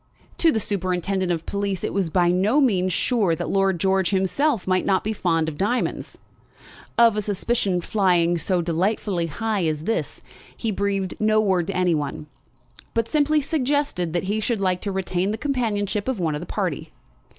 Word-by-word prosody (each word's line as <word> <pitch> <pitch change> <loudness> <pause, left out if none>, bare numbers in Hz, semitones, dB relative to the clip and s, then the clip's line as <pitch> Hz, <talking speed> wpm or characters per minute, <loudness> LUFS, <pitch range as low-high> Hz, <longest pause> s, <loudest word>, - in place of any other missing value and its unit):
To 330 - +5
the 220 - 0
superintendent 185 -1 -1
of 165 -1 -2
police 200 -2 -2
it - - -2
was 190 -4 0
by 175 +1 +2
no 200 +10 +2
means 190 -9 +2
sure 205 -5 +1
that - - -4
Lord 195 -2 +2
George 190 -1 +2
himself 200 - +1
might 185 0 +1
not 190 -1 +1
be 220 - -1
fond 165 -5 0
of 150 -2 -5
diamonds. 240 +6 -1 0.8
Of 230 -2 +6
a 210 - 0
suspicion 200 -2 0
flying 175 -3 +2
so 175 +2 0
delightfully 180 +1 0
high 205 +3 -1
as 155 -1 -2
this, 225 +6 -3 0.3
he 225 - -1
breathed 195 -1 -1
no 215 0 +3
word 190 -5 +1
to 195 - -2
any 180 -2 +2
one; 150 -1 -3 0.7
but 230 -1 +1
simply 300 +2 +2
suggested 285 - -1
that 175 - 0
he 205 +3 -1
should 220 0 -1
like 185 -2 0
to 200 - -3
retain 190 0 -1
the 215 - -2
companionship 220 -6 -1
of 260 -6 -1
one 165 -3 0
of 150 - -4
the 175 - -8
party. - - -3
195 Hz, 185 wpm, -23 LUFS, 180-220 Hz, 0.8 s, Of